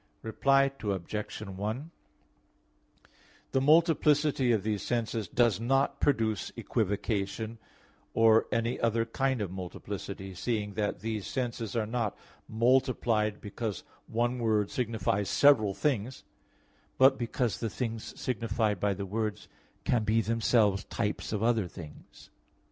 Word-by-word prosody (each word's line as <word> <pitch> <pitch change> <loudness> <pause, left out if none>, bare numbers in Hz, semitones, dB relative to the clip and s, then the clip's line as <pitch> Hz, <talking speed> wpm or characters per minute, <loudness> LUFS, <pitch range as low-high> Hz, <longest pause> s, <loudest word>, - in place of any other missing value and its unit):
Reply 135 +4 +3
Obj. 105 +1 -3
1: 105 - -4 1.6
The 135 - +2
multiplicity 150 -3 +4
of 110 -4 +1
these 105 -2 -1
senses 115 -2 -2
does 120 -5 +2
not 135 +4 +1
produce 110 -7 +1
equivocation 105 +1 -2 0.6
or 115 0 +5
any 115 +1 0
other 115 0 +1
kind 130 +1 -1
of 95 - -5
multiplicity, 95 +1 -6
seeing 105 +1 -2
that 105 0 -2
these 110 -2 -3
senses 120 -5 -3
are 115 -2 +1
not 115 -2 -2 0.3
multiplied 115 -2 +2
because 105 -1 -5 0.2
one 120 +2 0
word 110 -3 +1
signifies 105 -5 -1
several 110 -9 +5
things, 130 -3 -1 0.7
but 135 +1 +6
because 120 -1 -1
the 115 - -2
things 115 -1 -5
signified 110 -3 -1
by 100 +1 +1
the 100 +1 -4
words 105 +1 -3 0.4
can 120 -3 +1
be 110 +1 +2
themselves 110 -3 +2
types 105 -2 -3
of 105 0 -1
other 115 -5 +2
things. 80 -4 -12
110 Hz, 120 wpm, -30 LUFS, 105-120 Hz, 1.6 s, but